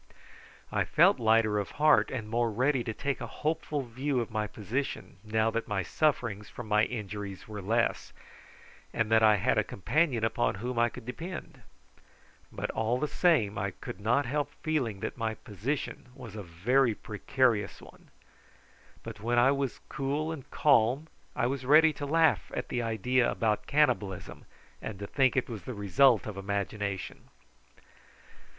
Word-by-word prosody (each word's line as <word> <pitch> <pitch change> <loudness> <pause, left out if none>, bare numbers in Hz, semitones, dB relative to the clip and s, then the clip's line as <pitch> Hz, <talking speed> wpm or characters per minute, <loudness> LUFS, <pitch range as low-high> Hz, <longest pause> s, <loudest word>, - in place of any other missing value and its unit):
I - - +1
felt - - +4
lighter 110 -2 +3
of 100 - -3
heart 150 0 +5
and 115 -5 -4
more 115 +1 +1
ready 130 +3 +1
to 110 - -2
take 140 +5 -3
a - - -4
hopeful 155 -2 -2
view 130 +3 -2
of 115 - -3
my 110 0 -1
position 115 +4 -4
now 110 +1 +1
that 115 0 -2
my 105 -2 -1
sufferings 120 - 0
from 120 - -8
my 105 +1 +3
injuries 105 -4 -6
were 105 -2 -6
less, 115 +4 0 0.8
and 110 -1 0
that 110 0 +5
I 110 -1 +6
had 100 - +2
a - - +2
companion 125 - 0
upon 115 -1 +1
whom 120 +4 -3
I 120 0 +4
could 125 0 -11
depend. 165 +8 -7 0.9
But - - -4
all 115 +2 0
the 150 - -1
same 145 - +2
I 100 +1 -1
could 120 - -7
not 120 +7 +2
help 145 +3 -1
feeling 130 -11 -1
that - - -4
my 110 -1 -1
position 120 +6 -4
was 120 -6 -10
a 105 - -5
very 110 +8 +1
precarious 115 -1 0
one. - - -16 0.9
But 115 -2 -8
when 120 +3 0
I 125 +3 +6
was 140 -2 -2
cool 145 +4 -2
and 145 -5 -8
calm 140 +2 +3 0.3
I - - +1
was 130 +1 -2
ready 155 +4 +6
to 145 0 -5
laugh 160 +2 +2
at - - -4
the 120 - -1
idea 115 +2 +1
about 110 -2 0
cannibalism, 105 - 0 0.4
and 110 - -6
to 100 - -6
think 130 +4 +2
it 130 - +1
was 110 -5 -7
the 125 - -5
result 110 +4 +4
of 105 -2 -6
imagination. 100 0 -4
115 Hz, 165 wpm, -29 LUFS, 105-135 Hz, 0.9 s, I